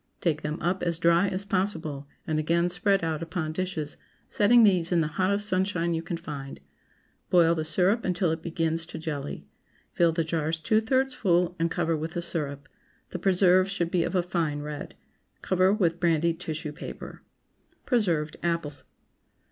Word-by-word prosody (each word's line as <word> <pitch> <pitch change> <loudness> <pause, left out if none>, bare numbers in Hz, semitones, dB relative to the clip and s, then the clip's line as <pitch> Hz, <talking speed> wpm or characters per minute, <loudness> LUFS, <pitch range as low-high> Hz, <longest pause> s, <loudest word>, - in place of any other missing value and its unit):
Take 160 -3 0
them 150 +2 -3
up 180 +2 0
as 170 -2 +1
dry 170 +3 +3
as 190 +1 -2
possible, 165 -8 -2 0.2
and 155 -1 0
again 170 +3 +1
spread 195 +1 +1
out 160 -1 -1
upon 160 -1 -3
dishes, 160 -4 -3 0.3
setting 235 +3 +5
these 185 -5 +3
in 170 -2 +3
the - - +1
hottest 200 +2 +2
sunshine 185 -3 0
you 165 - -1
can 170 +1 -4
find. 145 -4 -7 0.7
Boil 170 -2 +5
the 160 -2 -2
syrup 185 +8 +2
until 180 -2 0
it 160 0 -3
begins 165 -1 -2
to - - -7
jelly; 150 -3 -5 0.5
fill 170 -1 +3
the 165 0 0
jars 160 0 -1
two 215 +7 +2
thirds 260 +3 +1
full 175 -4 +1
and 165 0 +1
cover 165 0 0
with 160 +2 -4
the 175 - -2
syrup. 150 -3 -4 0.4
The 180 - -4
preserves 185 0 +4
should 175 -4 -2
be 175 -3 +2
of 175 - -3
a 180 - +2
fine 165 -4 -1
red. 150 0 -7 0.5
Cover 185 0 +3
with 175 -5 +1
brandied 170 -1 +1
tissue 160 -3 -4
paper. 150 - -9 0.6
PRESERVED 170 - 0
APPLES. 155 -5 -2
170 Hz, 170 wpm, -27 LUFS, 160-185 Hz, 0.7 s, setting